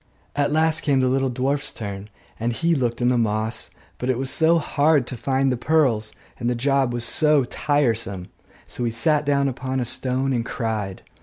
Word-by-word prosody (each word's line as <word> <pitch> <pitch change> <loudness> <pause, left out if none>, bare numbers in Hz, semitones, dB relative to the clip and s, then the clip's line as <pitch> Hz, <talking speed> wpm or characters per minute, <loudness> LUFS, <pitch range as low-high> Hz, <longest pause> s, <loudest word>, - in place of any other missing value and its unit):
At 145 0 +1
last 160 0 +2
came 140 -2 +2
the 130 - +2
little 135 +1 +1
dwarf's 135 +3 -1
turn; 100 -1 -7 0.3
and 115 +1 -1
he 165 +9 +1
looked 120 -4 -1
in 120 - +4
the 125 -1 +2
moss; 110 0 -1 0.3
but 125 - -2
it 130 - +1
was 135 +1 -2
so 165 +1 +3
hard 150 -3 +2
to 125 - -5
find 135 +2 0
the 125 - -1
pearls, 120 -7 +1 0.3
and 120 -1 -1
the 125 - 0
job 135 +1 +1
was 120 -1 -1
so 150 +1 +3
tiresome! 115 -9 -1 0.4
so 125 - -6
he 120 - +1
sat 145 +6 +1
down 140 -1 +2
upon 130 0 -3
a 125 - -1
stone 130 +2 -1
and 120 -2 0
cried. 110 -6 -4
130 Hz, 200 wpm, -23 LUFS, 115-140 Hz, 0.4 s, in